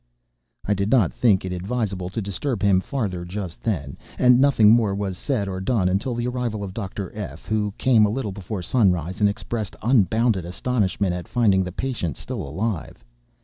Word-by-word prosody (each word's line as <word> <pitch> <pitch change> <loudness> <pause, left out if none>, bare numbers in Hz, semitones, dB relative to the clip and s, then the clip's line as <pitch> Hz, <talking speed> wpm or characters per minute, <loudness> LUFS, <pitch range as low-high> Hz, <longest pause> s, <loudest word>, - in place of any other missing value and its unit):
I 105 - +2
did 100 +1 -1
not 110 - +3
think 95 - +3
it 95 - -4
advisable 95 -1 -2
to 105 +3 -4
disturb 100 +4 -3
him 95 -2 +4
farther 100 -9 -3
just 90 -1 -6
then, 75 -12 -2 0.2
and 125 0 +5
nothing 120 -7 +6
more 110 -4 +3
was 100 -2 -3
said 105 0 -2
or 95 -1 -4
done 100 -2 +1
until 100 +7 0
the 120 0 -2
arrival 120 -4 -2
of 95 -2 -6
Dr. 100 -3 -5
F——, 105 -2 -7
who 105 -1 0
came 115 -4 +4
a - - -1
little 110 -2 -2
before 95 0 -5
sunrise, 90 -5 +1
and 105 -1 +4
expressed 110 -1 -4
unbounded 110 -3 +3
astonishment 95 0 -1
at 90 -1 -5
finding 100 -6 +3
the 90 - -5
patient 110 - -3
still 125 -5 -5
alive. 85 - -4
100 Hz, 185 wpm, -23 LUFS, 95-115 Hz, 0.2 s, nothing